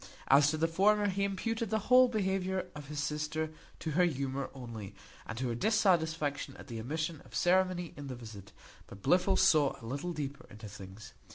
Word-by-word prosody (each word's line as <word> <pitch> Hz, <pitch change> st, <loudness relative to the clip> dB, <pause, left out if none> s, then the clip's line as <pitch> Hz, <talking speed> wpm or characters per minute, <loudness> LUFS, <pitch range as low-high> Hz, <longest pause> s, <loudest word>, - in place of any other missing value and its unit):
As 140 Hz, +2 st, +6 dB
to 155 Hz, -, -1 dB
the 165 Hz, +1 st, +2 dB
former, 205 Hz, +5 st, +3 dB
he 200 Hz, +1 st, -1 dB
imputed 225 Hz, +3 st, -1 dB
the 220 Hz, -, +1 dB
whole 255 Hz, 0 st, +7 dB
behaviour 190 Hz, -4 st, -1 dB
of 150 Hz, -2 st, -9 dB
his 145 Hz, 0 st, -3 dB
sister 155 Hz, +1 st, -2 dB, 0.3 s
to 160 Hz, -, -4 dB
her 175 Hz, +4 st, +3 dB
humour 140 Hz, -4 st, -1 dB
only, 110 Hz, -6 st, -8 dB, 0.3 s
and 115 Hz, -, -5 dB
to 130 Hz, 0 st, -1 dB
her -, -, -1 dB
dissatisfaction 160 Hz, -, +1 dB
at -, -, -11 dB
the 115 Hz, -4 st, -6 dB
omission 155 Hz, +6 st, -3 dB
of -, -, -13 dB
ceremony 180 Hz, -1 st, +2 dB
in 145 Hz, -1 st, -7 dB
the 130 Hz, -, -5 dB
visit; 110 Hz, -5 st, -10 dB, 0.4 s
but 95 Hz, -1 st, -12 dB
Blifil 185 Hz, +1 st, +3 dB
saw 155 Hz, -7 st, +4 dB
a -, -, -11 dB
little 140 Hz, +9 st, -3 dB
deeper 145 Hz, -3 st, -5 dB
into 110 Hz, +1 st, -10 dB
things. 100 Hz, +1 st, -11 dB
155 Hz, 190 wpm, -32 LUFS, 130-185 Hz, 0.4 s, whole